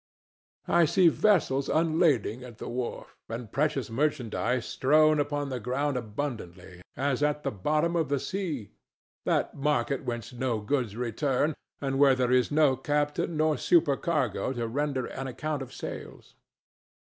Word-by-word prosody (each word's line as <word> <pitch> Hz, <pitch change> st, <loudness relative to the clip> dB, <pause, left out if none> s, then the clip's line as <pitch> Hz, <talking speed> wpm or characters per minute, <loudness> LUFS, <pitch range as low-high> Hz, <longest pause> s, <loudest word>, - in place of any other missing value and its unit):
I 170 Hz, -1 st, +5 dB
see 175 Hz, +2 st, +5 dB
vessels 155 Hz, -9 st, +2 dB
unlading 155 Hz, -, +2 dB
at 120 Hz, -3 st, -11 dB
the -, -, -7 dB
wharf 120 Hz, 0 st, -5 dB
and 115 Hz, -1 st, -6 dB
precious 140 Hz, -4 st, 0 dB
merchandise 125 Hz, -2 st, 0 dB
strown 155 Hz, +2 st, +3 dB
upon 145 Hz, 0 st, -1 dB
the 130 Hz, -2 st, -3 dB
ground 130 Hz, +5 st, -1 dB
abundantly 105 Hz, -7 st, -5 dB, 0.2 s
as 140 Hz, 0 st, 0 dB
at 150 Hz, 0 st, +1 dB
the -, -, -1 dB
bottom 150 Hz, -, 0 dB
of 165 Hz, -4 st, +1 dB
the 140 Hz, -1 st, +1 dB
sea—that 160 Hz, -, -4 dB
market 140 Hz, -2 st, 0 dB
whence 120 Hz, -1 st, -5 dB
no 120 Hz, -2 st, -1 dB
goods 110 Hz, -1 st, -1 dB
return, 130 Hz, +5 st, 0 dB, 0.3 s
and 135 Hz, -1 st, -1 dB
where 140 Hz, -2 st, +6 dB
there 125 Hz, -1 st, +1 dB
is 125 Hz, -1 st, +3 dB
no 150 Hz, -3 st, +4 dB
captain 150 Hz, +2 st, -1 dB
nor 155 Hz, -1 st, +2 dB
supercargo 155 Hz, -3 st, +1 dB
to 120 Hz, -2 st, -2 dB
render 135 Hz, +1 st, -1 dB
an 135 Hz, 0 st, -5 dB
account 145 Hz, +3 st, -3 dB
of 130 Hz, -1 st, -7 dB
sales. -, -, -8 dB
135 Hz, 145 wpm, -28 LUFS, 120-150 Hz, 0.3 s, where